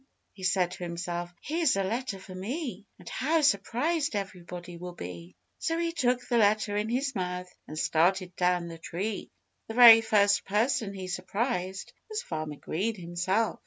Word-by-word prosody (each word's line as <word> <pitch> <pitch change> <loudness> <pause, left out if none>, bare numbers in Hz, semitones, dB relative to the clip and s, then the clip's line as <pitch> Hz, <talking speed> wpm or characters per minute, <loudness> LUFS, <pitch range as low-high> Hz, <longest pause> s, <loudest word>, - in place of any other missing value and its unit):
he 195 - -14
said 185 -1 +2
to - - -9
himself. 175 0 -4
"Here's 320 - +2
a 195 - +1
letter 230 +2 -2
for 190 0 -11
me! 210 - -5
And 180 - -16
how 315 +5 +1
surprised 285 - +1
everybody 180 -3 -6
will 175 +1 -8
be!" 90 - -8 0.2
So 330 - 0
he 335 0 0
took 250 -6 0
the 240 - +2
letter 210 0 +3
in 210 +1 0
his 270 +3 0
mouth 180 -2 -4
and 155 - -7
started 180 +3 +2
down 180 -1 +1
the 165 -1 -8
tree. 195 +6 -4 0.4
The 225 - -6
very 235 -2 +10
first 205 -2 +3
person 215 0 0
he 190 -1 -6
surprised 190 +1 -2 0.2
was 430 -1 -3
Farmer 155 -2 -4
Green 200 +10 -2
himself. 185 +4 -1
195 Hz, 165 wpm, -29 LUFS, 180-235 Hz, 0.4 s, very